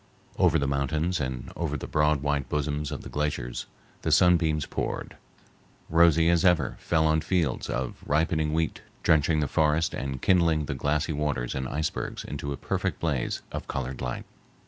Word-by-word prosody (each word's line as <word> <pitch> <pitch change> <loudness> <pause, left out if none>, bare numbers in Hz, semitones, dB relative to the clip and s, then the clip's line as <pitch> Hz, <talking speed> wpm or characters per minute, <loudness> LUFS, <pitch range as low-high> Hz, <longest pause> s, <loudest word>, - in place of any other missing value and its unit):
Over - - +5
the 70 - 0
mountains 75 +6 0
and 65 -2 -4
over 75 -3 -2
the - - -6
broad 75 -1 +2
white 70 -2 0
bosoms 75 0 -1
of - - -4
the - - -8
glaciers 75 -5 -2 0.3
the - - -1
sunbeams 80 -4 +4
poured, - - -4 0.8
rosy 85 -1 +5
as 85 0 +3
ever 85 -8 +3
fell 80 -2 +1
on 80 0 +3
fields 85 -8 0
of 60 0 -3
ripening 80 +1 +1
wheat, 80 0 -1 0.2
drenching 80 0 +3
the 75 - +1
forests 80 +3 +2
and 65 -1 -3
kindling 85 -3 +3
the - - -3
glassy 75 +4 0
waters 70 -5 -1
and 65 -1 -3
icebergs 75 +1 -3
into 70 - -5
a 70 - -3
perfect - - -2
blaze 70 -7 -1
of - - -5
colored 65 -1 -4
light. 60 -1 -4
75 Hz, 170 wpm, -27 LUFS, 70-80 Hz, 0.8 s, Over